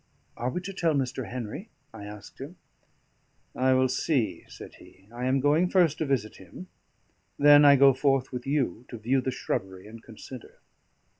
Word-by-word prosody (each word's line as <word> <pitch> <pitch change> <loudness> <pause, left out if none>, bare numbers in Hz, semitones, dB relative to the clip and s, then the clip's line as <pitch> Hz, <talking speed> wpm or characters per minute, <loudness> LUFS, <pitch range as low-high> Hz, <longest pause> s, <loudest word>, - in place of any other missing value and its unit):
"Are 120 +2 -3
we 180 - -4
to 195 +2 -7
tell 165 -5 0
Mr. 130 -4 -3
Henry?" 125 - -7 0.2
I 105 -2 -9
asked 105 +4 -11
him. 145 +7 -8 1.0
"I 130 0 +2
will 130 0 +3
see," 120 - -1
said - - -12
he. 95 +1 -19
"I 120 +1 -5
am 130 +1 +1
going 150 +6 +2
first 175 -6 +2
to 155 - -1
visit 125 -6 -2
him; 140 - -12 0.7
then 145 0 +7
I 140 -1 +7
go 135 0 +6
forth 135 0 0
with 125 0 -6
you 135 -7 -1
to 120 - -8
view 125 +5 0
the 130 - -3
shrubbery 95 -6 -4
and 110 +2 -12
consider." 120 +2 -12
130 Hz, 175 wpm, -27 LUFS, 115-145 Hz, 1.0 s, then